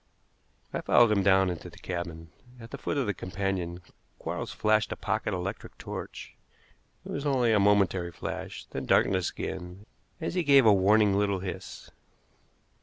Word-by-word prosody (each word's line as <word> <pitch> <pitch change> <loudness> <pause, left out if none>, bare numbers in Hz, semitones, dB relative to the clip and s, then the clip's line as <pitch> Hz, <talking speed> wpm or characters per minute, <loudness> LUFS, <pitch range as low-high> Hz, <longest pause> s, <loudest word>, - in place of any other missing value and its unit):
I - - -2
followed 120 -2 +5
him 100 -2 +3
down 95 -1 +4
into 85 - -7
the - - -16
cabin. 85 -2 -6 0.3
At 115 0 -11
the 140 - -7
foot 145 - -2
of 140 - +1
the 105 - 0
companion 90 -2 -3 0.4
Quarles - - -4
flashed 110 0 +1
a - - -2
pocket 110 +1 -2
electric 95 +2 -5
torch. - - -7 0.7
It - - -7
was 140 - -3
only 125 -4 +2
a 105 - +4
momentary 100 -3 +2
flash, - - -6
then - - -6
darkness 95 -2 +3
again 90 +3 -6 0.3
as 165 - -3
he 180 - +1
gave 140 -5 +6
a 110 - +7
warning 100 +1 +4
little 100 -2 0
hiss. 95 -1 -7
100 Hz, 165 wpm, -28 LUFS, 90-110 Hz, 0.7 s, a